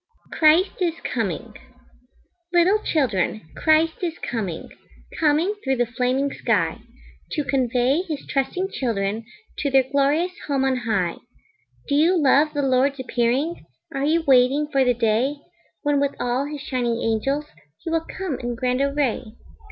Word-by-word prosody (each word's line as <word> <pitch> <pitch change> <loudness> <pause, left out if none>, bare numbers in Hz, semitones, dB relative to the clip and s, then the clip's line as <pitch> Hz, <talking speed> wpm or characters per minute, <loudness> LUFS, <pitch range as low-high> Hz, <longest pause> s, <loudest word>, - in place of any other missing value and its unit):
Christ 325 +5 +3
Is 340 -2 +1
Coming - - -3 1.0
Little 355 +4 +4
children, 215 - 0
Christ 320 +2 +2
is 340 -2 -2
coming, 195 -9 -4 0.5
Coming 320 +5 +2
through 265 -1 +1
the 245 -1 +1
flaming 255 +3 -1
sky, - - 0 0.5
To 300 - 0
convey 260 +2 +1
his 315 -6 -6
trusting 360 +8 -1
children 220 -3 -2 0.3
To 290 - 0
their 270 -1 +4
glorious 285 +6 +1 0.2
home 275 -2 +1
on 265 -1 +2
high 210 -8 -1 0.7
Do 285 - -1
you 325 +6 +4
love 295 +1 +3
the 290 - 0
Lord's 270 +1 +2
appearing? 255 - -1 0.3
Are 275 +1 -1
you 325 +2 +2
waiting 270 +3 +4
for 275 -2 +3
the 250 -1 +2
day 230 +5 +1 0.5
When 290 -1 +2
with 280 0 0
all 245 +3 0
his 295 -1 -6
shining 245 -5 -1
angels 270 +7 0 0.4
He 330 - -4
will 330 0 +1 0.2
come 370 -9 -3
in 240 -1 -3
grand 250 +1 0
array? 280 -3 0
275 Hz, 145 wpm, -23 LUFS, 245-305 Hz, 1.0 s, Little